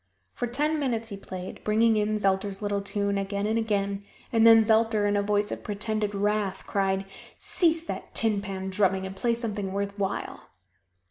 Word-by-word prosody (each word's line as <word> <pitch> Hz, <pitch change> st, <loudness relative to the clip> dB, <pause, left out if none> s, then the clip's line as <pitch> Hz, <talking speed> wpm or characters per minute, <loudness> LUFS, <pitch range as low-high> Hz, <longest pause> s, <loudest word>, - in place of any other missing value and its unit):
For 245 Hz, -, -2 dB
ten 300 Hz, +6 st, 0 dB
minutes 230 Hz, -5 st, -1 dB
he 200 Hz, -, -5 dB
played, 185 Hz, -1 st, -8 dB
bringing 220 Hz, +1 st, +3 dB
in 215 Hz, 0 st, +1 dB
Zelter's 195 Hz, -1 st, 0 dB
little 205 Hz, -1 st, -1 dB
tune 200 Hz, 0 st, -1 dB
again 200 Hz, +1 st, -2 dB
and 220 Hz, +2 st, +1 dB
again, 200 Hz, -2 st, -1 dB, 0.3 s
and 225 Hz, 0 st, +6 dB
then 225 Hz, -1 st, +8 dB
Zelter 220 Hz, -1 st, +3 dB
in 205 Hz, -, +1 dB
a 205 Hz, -, +2 dB
voice 205 Hz, 0 st, +1 dB
of -, -, -5 dB
pretended 210 Hz, 0 st, -2 dB
wrath 205 Hz, -1 st, -1 dB
cried, 195 Hz, -1 st, 0 dB, 0.3 s
"Cease 330 Hz, -2 st, +2 dB
that -, -, -7 dB
tin 215 Hz, -3 st, +1 dB
pan 190 Hz, -1 st, -5 dB
drumming 190 Hz, -1 st, +1 dB
and 190 Hz, 0 st, -6 dB
play 235 Hz, +3 st, +1 dB
something 210 Hz, -4 st, -3 dB
worth 200 Hz, +1 st, -3 dB
while." 195 Hz, -1 st, -3 dB
205 Hz, 180 wpm, -27 LUFS, 195-225 Hz, 0.3 s, then